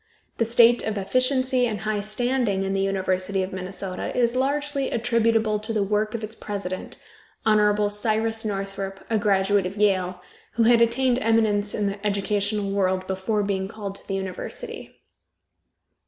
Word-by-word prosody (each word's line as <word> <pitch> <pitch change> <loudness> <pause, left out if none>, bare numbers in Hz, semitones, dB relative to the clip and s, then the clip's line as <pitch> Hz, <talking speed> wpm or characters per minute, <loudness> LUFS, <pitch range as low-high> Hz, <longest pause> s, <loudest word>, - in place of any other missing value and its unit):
The 230 - +3
state 235 +1 +5
of 220 -1 -3
efficiency 255 +4 +1
and 215 -2 -4
high 215 -1 -1
standing 215 -2 0
of 195 - -1
the 195 - 0
University 190 0 0
of 185 - -6
Minnesota 190 0 -4
is 240 0 +2
largely 280 +1 0
attributable 225 -2 +1
to 215 +2 -3
the 215 -2 +1
work 210 +2 0
of 225 - -4
its 215 +1 -4
president, 195 -4 -5 0.5
Hon. 210 -1 +3
Cyrus 220 +2 0
Northrop, 195 -2 -4
a 220 - +2
graduate 200 -1 +2
of 195 +3 -8
Yale, 185 -3 +1 0.3
who 230 - +2
had 235 0 +5
attained 245 +2 +3
eminence 215 -3 +2
in 210 - -1
the 200 +1 -3
educational 205 0 0
world 190 -2 0
before 190 +3 -1
being 190 -1 -1
called 200 -1 -6
to - - -13
the 195 - -2
university. 195 - -6
210 Hz, 155 wpm, -24 LUFS, 195-230 Hz, 0.5 s, state